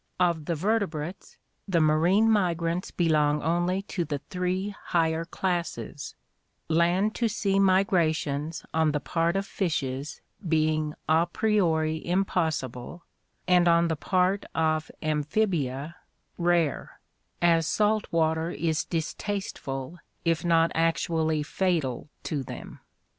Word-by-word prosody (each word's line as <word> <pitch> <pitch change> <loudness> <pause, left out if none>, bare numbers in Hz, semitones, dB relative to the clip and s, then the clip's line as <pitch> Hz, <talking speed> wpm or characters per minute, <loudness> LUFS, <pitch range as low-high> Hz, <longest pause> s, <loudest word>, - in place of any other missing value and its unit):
Of 170 -4 +1
the 170 - -1
vertebrates, 185 -3 -2 0.3
the 180 -4 +2
marine 165 +8 +4
migrants 175 -4 +1
belong 150 -3 +2
only 175 +4 0
to 175 - 0
the 145 -2 -3
three 185 +2 -1
higher 165 -1 +1
classes, 175 -5 -3 0.5
land 175 +6 +2
to 235 - 0
sea 200 -2 0
migrations 165 -6 +1
on 160 -2 +2
the 150 - 0
part 165 +4 0
of 195 0 0
fishes 150 -8 -3 0.3
being 155 -1 +1
a 160 +2 +3
priori 165 -6 +1
impossible 165 -6 -1 0.4
and 180 -1 +5
on 170 0 +4
the 160 - 0
part 185 +5 +1
of 155 -1 +1
amphibia 155 -2 -1 0.4
rare, 170 -3 0 0.4
as 165 -2 +3
salt 215 +2 +1
water 160 0 +1
is 160 -2 -1
distasteful 165 - -4 0.3
if 165 -1 +1
not 165 -1 +3
actually 160 -1 +1
fatal 155 -6 -1
to 150 -3 -2
them. 130 - -9
165 Hz, 115 wpm, -27 LUFS, 155-180 Hz, 0.5 s, and